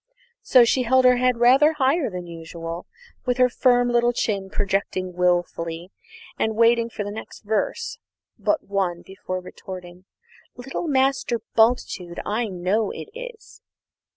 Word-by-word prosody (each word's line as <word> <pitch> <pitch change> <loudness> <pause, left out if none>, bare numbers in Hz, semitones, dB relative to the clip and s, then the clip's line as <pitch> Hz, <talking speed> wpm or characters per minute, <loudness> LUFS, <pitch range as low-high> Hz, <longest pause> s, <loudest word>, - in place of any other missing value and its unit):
So 250 -2 +6
she 255 +3 +2
held 255 +1 +3
her 250 0 +6
head 250 -1 +2
rather 265 +6 +5
higher 280 0 +1
than 180 -2 -6
usual, 165 0 -7 0.4
with 250 0 +1
her 250 0 +5
firm 245 0 +3
little 240 0 +2
chin 200 -4 -2
projecting 195 -2 -2
wilfully, 175 -1 -1 0.5
and 220 0 0
waited 230 +1 +3
for 210 - -4
the 205 - -5
next 220 - -9
verse 210 0 -2 0.4
but 315 - 0
one 190 -3 -2
before 185 -1 -6
retorting, 180 0 -10 0.5
"Little 270 +7 -5
Master 265 -3 +1 0.2
Bultitude, 220 -6 +1
I 220 +3 -1
know 195 +3 0
it - - -7
is." - - -10
220 Hz, 140 wpm, -23 LUFS, 185-250 Hz, 0.5 s, So